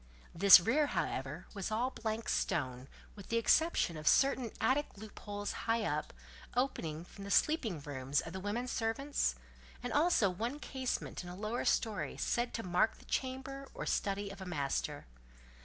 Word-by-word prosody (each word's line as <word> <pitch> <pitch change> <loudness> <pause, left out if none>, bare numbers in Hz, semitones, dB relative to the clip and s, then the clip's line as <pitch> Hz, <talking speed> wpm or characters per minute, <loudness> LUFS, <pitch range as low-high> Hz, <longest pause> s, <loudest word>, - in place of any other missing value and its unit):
This 195 +3 +10
rear, 260 - +2
however, 145 - -2
was 200 -1 -3
all 235 +4 0
blank 225 -1 -3
stone, 130 -7 -1 0.3
with 200 -2 -11
the 230 - +1
exception 270 - +3
of 155 - -6
certain 265 -3 +4
attic 290 +3 +2
loopholes 205 -1 -6 0.2
high 225 0 +3
up, - - -2 0.4
opening 170 - -1
from 200 - -11
the 200 - -6
sleeping 225 - +2
rooms 140 -1 -1
of 165 - -5
the 190 - -4
women 210 +6 -2
servants, 245 +5 0 0.5
and 245 -2 -3
also 300 - +4
one 230 +9 -2
casement 260 -9 -3
in 175 - -8
a 180 - -7
lower 215 +5 -3
story 220 -3 0
said 240 0 0
to 230 - -3
mark 180 +5 +2
the - - -17
chamber 270 +1 -3
or - - -4
study 200 0 -1
of 195 0 -10
a - - -5
master. 145 -6 -2
215 Hz, 165 wpm, -34 LUFS, 180-255 Hz, 0.5 s, This